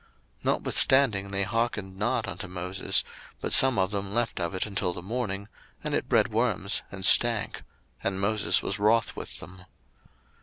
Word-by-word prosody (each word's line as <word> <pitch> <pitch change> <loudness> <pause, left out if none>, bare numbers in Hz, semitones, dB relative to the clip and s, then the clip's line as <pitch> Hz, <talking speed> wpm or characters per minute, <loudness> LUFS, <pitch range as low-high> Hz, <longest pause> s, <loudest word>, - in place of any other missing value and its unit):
02:016:020 - - -22
Notwithstanding 115 -8 +2
they 100 0 -1
hearkened 110 -3 -3
not 105 +2 -2
unto - - -6
Moses; 90 +1 -1 0.4
but - - -1
some 130 -3 +9
of 95 0 0
them 100 -1 -4
left 120 -1 -2
of 85 0 -3
it 95 - -2
until 95 -3 -2
the 90 - -8
morning, 100 -2 -4 0.4
and - - -3
it - - -2
bred - - +3
worms, 105 -4 0
and 95 -1 -4
stank: 115 0 +3 0.4
and 95 -1 -2
Moses 105 +2 +1
was 100 - -3
wroth 110 +3 +1
with - - -8
them. 90 0 -12
100 Hz, 165 wpm, -26 LUFS, 95-115 Hz, 0.4 s, some